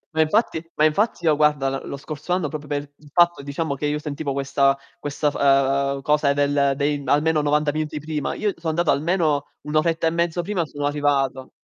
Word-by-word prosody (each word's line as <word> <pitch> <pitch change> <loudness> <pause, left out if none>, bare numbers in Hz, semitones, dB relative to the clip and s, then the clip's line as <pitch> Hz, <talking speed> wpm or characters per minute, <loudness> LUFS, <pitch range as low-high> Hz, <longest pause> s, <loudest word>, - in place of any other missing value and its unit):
Ma 160 - +4
infatti 160 0 +1
ma 155 - +3
infatti 175 +2 +1
io, 155 -2 +4
guarda, 150 -2 +2
l - - -10
lo 140 - -5
scorso 150 +4 -5
anno 180 -4 0
proprio 150 -1 -7
per 145 -1 -1 0.2
il 150 -1 -18
fatto, 175 -2 +3
diciamo, 140 +2 -3
che 145 +2 -2
io 150 0 0
sentivo 150 -1 -4
questa 140 0 +1 0.2
questa 145 0 -1
f - - -13
ehm, 140 0 +2
cosa 150 -1 +2
del 140 -1 +2
dei 145 0 0
almeno 150 +2 +2
90 150 0 +1
minuti 155 0 -3
prima, 150 -1 -3
io 210 -3 -1
so 165 -1 -4
andato 170 +1 +1
almeno 155 -2 +1
1 150 +1 -6
oretta 165 +1 +1
e 160 - +3
mezzo 170 0 0
prima 180 -4 -1
sono 145 0 -4
arrivato. 140 -3 0
150 Hz, 205 wpm, -22 LUFS, 140-160 Hz, 0.2 s, Ma